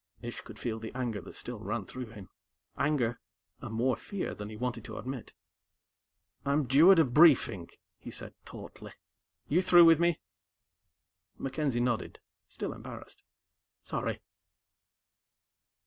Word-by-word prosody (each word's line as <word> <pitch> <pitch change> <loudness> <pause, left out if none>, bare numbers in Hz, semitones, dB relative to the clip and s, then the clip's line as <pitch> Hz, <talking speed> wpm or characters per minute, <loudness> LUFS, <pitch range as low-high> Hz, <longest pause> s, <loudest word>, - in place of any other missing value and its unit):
Ish 120 0 -6
could 110 - -12
feel 110 -1 -3
the 110 0 -7
anger 120 -6 -2
that - - -11
still 120 -3 -4
ran 105 0 -3
through 125 +5 -7
him 105 -4 -11 0.5
anger, 130 -5 0 0.4
and 110 - -6
more 125 +2 +2
fear 200 -2 -4
than 105 0 -7
he 110 - -8
wanted 120 -1 -3
to - - -7
admit. 130 -2 -6 1.1
"I'm 140 +2 +2
due 145 +9 +7
at 190 - +7
a 160 - +6
briefing," 125 - +5 0.3
he - - -9
said - - -5
tautly. - - -10 0.5
"You 170 +5 +3
through 175 -2 +7
with 165 -1 +7
me?" 170 -1 +2 1.2
MacKenzie 135 -2 -1
nodded, 120 -2 -2 0.3
still - - -5
embarrassed. - - -10 0.6
"Sorry." - - -3
125 Hz, 135 wpm, -30 LUFS, 110-150 Hz, 1.2 s, due